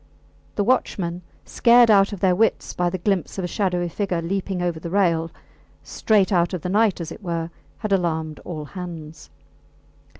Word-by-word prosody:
The 205 - +1
watchmen, 185 -7 0 0.2
scared 235 -1 +5
out 195 -1 +5
of 200 -3 -7
their 185 -2 +3
wits 225 +4 +1
by 175 0 0
the 185 - -3
glimpse 190 0 -1
of 190 - -2
a - - -1
shadowy 180 -2 -1
figure 180 0 -2
leaping 190 +2 -2
over 175 -2 -1
the 170 - -6
rail, 170 -4 +1 0.5
straight 210 -2 +1
out 175 0 +2
of 175 - -7
the 180 - -2
night 210 0 +2
as 170 -1 -5
it - - -9
were, 170 -3 -3 0.3
had 215 -2 -4
alarmed 160 -4 -1
all 155 -4 -6
hands. 165 -3 -9
180 Hz, 175 wpm, -23 LUFS, 170-200 Hz, 0.5 s, scared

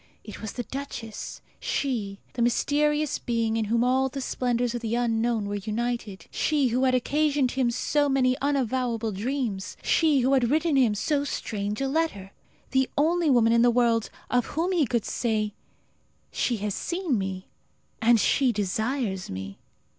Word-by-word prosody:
It 210 - -9
was 215 -2 -5
the 245 - -4
duchess 235 -3 -6 0.2
she, 220 -8 -2 0.2
the 245 - -3
mysterious 295 +5 +1
being 230 -2 0
in 225 -1 0
whom 230 +3 +1
all 260 +2 +2
the 275 - -6
splendours 245 -2 -1
of 240 - -3
the 230 0 -1
unknown 230 -2 +1
were 205 - -3
united; 220 -1 -3
she 290 -4 +1
who 250 +3 +1
had 255 -1 +3
occasioned 285 0 +1
him 260 -2 +1
so 290 +4 +1
many 255 -2 +3
unavowable 250 -5 0
dreams; 210 -2 -3
she 305 -5 +3
who 260 +3 +2
had 250 -3 +3
written 315 +1 +2
him 245 -6 +4
so 285 +7 0
strange 210 -5 -3
a 270 - +1
letter! 270 -11 -1 0.4
The 265 0 +2
only 330 +2 +3
woman 230 -3 +4
in 235 - +4
the 240 - +6
world 235 -2 +2 0.2
of 245 -1 +2
whom 345 +3 +1
he 330 -7 +2
could 235 -1 0
say, 215 -3 -1 0.8
"She 240 - 0
has 205 0 -2
seen 345 - -1
me, 190 -1 -4 0.6
and 230 0 +5
she 260 +4 +3
desires 215 0 -2
me!" 95 +1 -6
245 Hz, 165 wpm, -26 LUFS, 220-275 Hz, 0.8 s, the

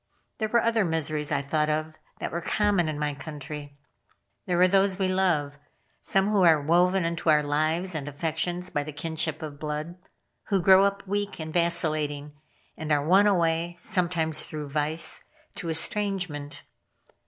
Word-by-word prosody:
There 220 - 0
were 235 +1 +2
other 230 -2 +2
miseries 155 -3 -1
I 140 -1 0
thought 150 +2 0
of 155 +1 -2 0.3
that - - -4
were 170 - -3
common 200 -3 +1
in 155 - -4
my 150 -1 -1
country. 145 -1 -8 0.7
There 180 -1 +1
were 180 +1 +6
those 195 0 +2
we 190 -1 0
love. 170 -7 0 0.4
Some 195 +1 +1
who 205 -2 +3
are 165 -4 +6
woven 175 +4 +2
into 170 0 -1
our 150 -1 +5
lives 155 +5 0
and 150 -3 -4
affections 160 +4 -3
by 145 - 0
the 150 +1 -7
kinship 160 0 -2
of 145 -2 -7
blood; 155 +3 -5 0.5
who 200 -2 +2
grow 190 +2 +6
up 200 0 -2
weak 205 0 -2
and 155 0 -6
vacillating, 155 -4 +1 0.4
and 155 -1 -5
are 145 -1 +2
won 195 +5 +5
away, 170 -3 +1
sometimes 170 -4 0
through 150 -2 -6
vice, 155 +3 0 0.3
to 170 - -6
estrangement. 165 -4 -2
160 Hz, 165 wpm, -26 LUFS, 150-185 Hz, 0.7 s, were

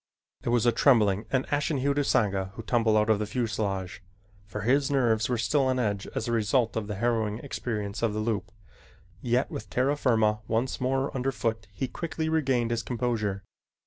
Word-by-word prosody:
It - - -3
was 120 -1 +2
a 120 - +5
trembling 105 -6 +3
and 130 -1 +1
ashen 145 +1 +1
hued 140 +2 0
Usanga 100 -8 +1
who 115 - -7
tumbled 110 -1 +2
out 105 +1 +3
of 105 - +2
the 105 - -2
fuselage, 100 -6 -2 0.5
for 105 +1 -5
his 135 +6 +2
nerves 120 -6 +2
were 125 - +1
still 130 +5 +2
on 130 0 +1
edge 100 -5 -1
as 110 - -2
a - - -1
result 115 +1 +1
of 110 -2 -2
the 105 - -4
harrowing 110 -1 0
experience 110 -5 -4
of 115 -3 +1
the - - -1
loop, 110 -3 -2 0.7
yet 125 +2 +1
with 105 -2 -6
terra 130 +6 +1
firma 110 -6 +2
once 115 +4 -1
more 135 +2 0
under 135 +1 0
foot, 115 -4 -2
he 100 +7 -3
quickly 160 +3 -3
regained 130 -7 +1
his 115 -1 0
composure. 110 -5 -2
115 Hz, 190 wpm, -27 LUFS, 105-130 Hz, 0.7 s, a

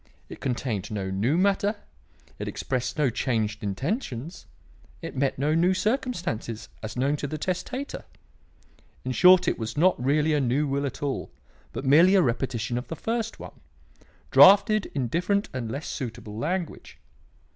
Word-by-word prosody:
It - - -10
contained 120 -6 -2
no 100 -3 -3
new 110 - +1
matter; 200 +2 +2 0.6
it - - -4
expressed 125 0 -3
no 145 -5 +2
changed 110 -3 -1
intentions; 135 - -4 0.5
it - - -7
met 135 0 0
no 145 +4 +1
new 175 +3 +3
circumstances, 185 - -2
as 110 +2 -6
known 140 +4 +1
to 145 - -3
the 155 - -4
testator. 190 - -4 1.0
In 130 - -1
short 180 +5 +6
it - - 0
was 110 +2 -5
not 170 -5 +3
really 150 +3 +2
a 150 - +2
new 135 +4 +1
will 140 0 -1
at 135 - -7
all, 140 -2 -2 0.4
but 135 - -6
merely 165 +8 +6
a 190 - +6
repetition 120 -1 -1
of 125 - -9
the 165 - -5
first 225 +5 -3
one, - - -11 0.7
drafted 205 +2 +7
in 130 -4 0
different 190 - 0
and 120 -4 -4
less 140 +5 -5
suitable 115 -5 -6
language. 170 - -4
140 Hz, 155 wpm, -26 LUFS, 120-180 Hz, 1.0 s, drafted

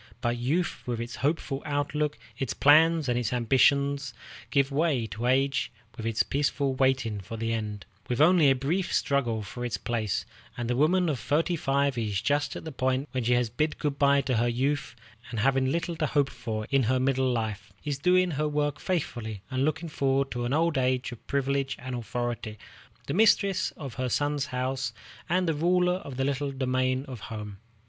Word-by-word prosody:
But 120 0 0
youth 150 +9 -1
with 120 -2 -2
its 120 0 -5
hopeful 140 -2 -1
outlook, 150 +1 -1 0.2
its 130 0 -3
plans 160 +1 +5
and 120 0 +1
its 120 -3 -1
ambitions, 135 +2 +2 0.3
gives 140 +1 +2
way 140 -5 +1
to 115 +2 -4
age 135 +2 +2 0.2
with 115 - -4
its 115 -1 +2
peaceful 140 -1 0
waiting 130 -5 +1
for 115 +4 -7
the 115 +1 -1
end, 105 -3 -4 0.2
with 120 - -1
only 160 -1 +6
a 135 - +4
brief 165 +9 -1
struggle 120 -6 +1
for 120 +5 -7
its 120 - -2
place; 110 -5 -2 0.3
and 120 -1 -3
the 125 - 0
woman 175 +7 +3
of 145 -6 -1
thirty 165 +7 +1
five 140 -3 +1
is 105 -4 -1
just 145 +4 0
at - - -6
the 160 - -6
point 130 +1 -1
when 130 -1 -2
she 125 - +3
has 120 -2 +1
bid 155 +6 -1
good 145 -2 -2
by 140 0 +5
to 130 -3 0
her 120 +2 +2
youth, 130 +1 -1 0.3
and, 115 -3 -2
having 135 +1 +2
little 170 +3 -1
to 155 - 0
hope 140 -1 +1
for 110 -3 -4
in 135 -1 +4
her 130 +2 +2
middle 130 0 +2
life, 110 -3 -3
is 145 -2 -2
doing 180 +3 +3
her 150 +1 0
work 145 -1 -1
faithfully, 120 - -3
and 130 +1 0
looking 155 +3 -1
forward 135 -2 0
to 120 0 -2
an 120 - -2
old 160 -2 +2
age 130 0 0
of 120 - -12
privilege 140 0 0
and 130 0 -6
authority, 120 -2 -3 0.5
the - - -3
mistress 200 -1 +3
of 135 -6 -6
her 130 - 0
son's 145 +2 0
house, 130 +1 -2 0.4
and 180 +1 +2
the 165 - +2
ruler 180 +3 +2
of 140 -8 -8
the 135 - +1
little 140 0 -1
domain 130 0 0
of 130 -3 -7
home. 105 0 -7
135 Hz, 195 wpm, -28 LUFS, 120-145 Hz, 0.5 s, only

